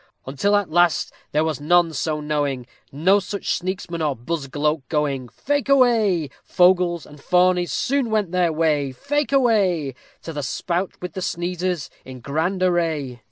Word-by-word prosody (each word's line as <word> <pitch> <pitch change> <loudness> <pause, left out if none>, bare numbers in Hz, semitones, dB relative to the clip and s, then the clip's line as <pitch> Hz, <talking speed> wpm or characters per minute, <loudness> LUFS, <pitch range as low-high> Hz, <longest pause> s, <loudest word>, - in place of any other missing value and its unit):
_ - - -33 0.2
Until 145 +10 +1
at 205 -5 0
last 175 0 +2 0.2
there 150 +1 +2
was 160 -2 -2
none 170 +1 +3
so 155 +2 -2
knowing, 145 -4 -2 0.3
No 180 +8 +3
such 200 +1 -5
sneaksman 180 -2 -4
or 145 -3 0
buzgloak 150 +2 -2
going. 140 -5 -1
Fake 285 - -2
away. 220 - +3
Fogles 180 -2 +3
and 150 0 -14
fawnies 180 +3 +2
soon 275 -2 0
went 210 -5 0
their 180 -2 +2
way, 155 -3 +1
Fake 290 - -2
away, 200 - +2 0.3
To 165 - -6
the 145 - -3
spout 175 +7 -2
with 180 -3 -5
the 190 - -5
sneezers 175 -3 -2
in 130 -1 -10
grand 165 +8 -1
array. 160 -8 0
170 Hz, 160 wpm, -22 LUFS, 150-185 Hz, 0.3 s, none